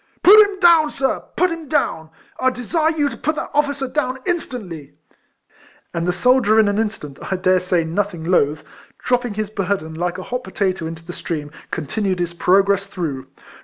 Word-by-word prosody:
" - - -39
Put 425 +3 +9
him 405 -2 -4
down, 335 -4 +6
sir! 270 -2 -1 0.2
put 360 -1 +2
him 330 -2 -6
down! 165 - -1 0.3
I 260 - +3
desire 260 +6 0
you 290 -1 +2
to 265 - -5
put 310 +6 -2
that - - -5
officer 285 -2 0
down 255 -1 -1
in 355 -1 +2
stantly 175 - -8 0.5
!" - - -30
And 170 +1 -2
the - - +3
soldier 230 +3 +3
in 215 - +5
an 205 +1 0
instant, 205 -11 -4
I - - +2
dare 185 0 +2
say 180 -2 0
nothing 175 +1 -2
loth, 155 -3 +1 0.3
dropping 245 -3 -1
his 215 -1 -3
burden, 195 -5 -2
like 175 +2 -2
a 185 - -6
hot 250 +4 -4
potatoe, 190 -7 -2
into 165 0 -8
the 175 - -7
stream, 150 -4 -5 0.2
continued 185 +5 -2
his 175 -1 -2
progress 195 +3 +2
through. 160 -9 -5
200 Hz, 195 wpm, -20 LUFS, 175-260 Hz, 0.5 s, Put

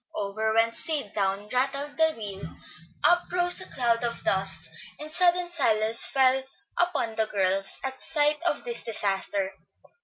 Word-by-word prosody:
Over 215 +2 -2
went 230 0 +3
Sid, 285 -6 -3
down 200 0 -1
rattled 275 +4 -1
the 320 +1 +2
wheel, 205 -5 -8 0.6
up 350 0 +3
rose 355 0 +4
a 370 - -5
cloud 235 -2 0
of 235 -1 -3
dust, 190 0 +1 0.3
and 305 +1 -8
sudden 355 0 +3
silence 225 -9 +1
fell 265 0 +3 0.3
upon 340 -10 0
the 220 0 -1
girls 195 -1 0
at 265 0 -5
sight 295 -1 +1
of 350 - 0
this 475 -1 0
disaster. 195 -2 -1
240 Hz, 150 wpm, -26 LUFS, 210-310 Hz, 0.6 s, rose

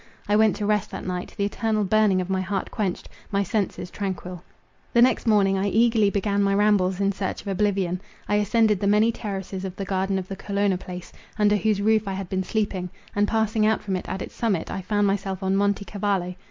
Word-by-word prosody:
I 205 - +3
went 215 -1 +4
to 210 - -3
rest 210 -1 +1
that - - -7
night; 180 -1 -4
the 200 - +1
eternal 215 +1 0
burning 205 -1 +3
of 180 - -4
my 190 0 0
heart 195 0 -3
quenched,—my 200 0 -3
senses 190 -2 -2
tranquil. 185 -3 -5 0.5
The 235 - +5
next 255 -1 +2
morning 195 -3 +4
I 195 - 0
eagerly 225 0 +3
began 200 0 0
my 195 0 +2
rambles 200 -3 +3
in 200 0 +2
search 195 -1 -3
of - - -13
oblivion. 195 -2 0 0.3
I 205 - +2
ascended 210 0 +3
the 200 - 0
many 210 +3 +4
terraces 195 -3 -5
of 190 -1 -5
the 195 - -4
garden 190 0 0
of 190 -1 -4
the 195 - -5
Colonna 200 -1 0
Palace, 180 -1 -8 0.2
under 210 -1 +4
whose 205 0 +1
roof 220 -1 +3
I 195 - -1
had 190 -1 -5
been 190 0 -1
sleeping; 195 -3 -2 0.3
and 205 0 +2
passing 220 0 +1
out 220 +1 +2
from 195 -2 -2
it 185 - -5
at 190 - -3
its - - -10
summit, 205 -8 -1
I 195 - -3
found 205 +2 +1
myself 195 -1 -1
on 190 0 +1
Monte 200 0 +1
Cavallo. 195 -3 -1
200 Hz, 220 wpm, -24 LUFS, 190-210 Hz, 0.5 s, The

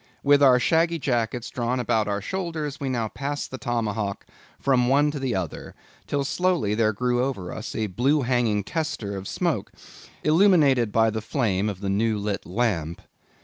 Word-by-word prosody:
With 145 0 +5
our 130 -3 +7
shaggy 165 +5 +2
jackets 120 -4 -2
drawn 125 +1 -1
about 110 -3 +1
our 100 0 -1
shoulders, 160 - -4
we 140 -2 -2
now 120 -3 -1
passed 140 +5 -4
the 130 - -6
Tomahawk 110 -5 -2 0.3
from 130 -3 +2
one 145 +3 +3
to 145 - -5
the 130 -4 -1
other, 90 -5 -5 0.3
till 140 -1 0
slowly 175 - 0
there 110 0 +2
grew 125 +3 0
over 100 -10 -3
us 110 - -6
a 110 - 0
blue 130 +9 +1
hanging 120 -5 +1
tester 135 - -3
of 95 0 -6
smoke, 165 - -1 0.5
illuminated 155 - +4
by 115 0 +3
the 110 0 -3
flame 105 -5 0
of 100 -2 -6
the 100 - -2
new 110 +2 +1
lit 100 -1 -3
lamp. 90 -6 -1
120 Hz, 175 wpm, -25 LUFS, 105-145 Hz, 0.5 s, our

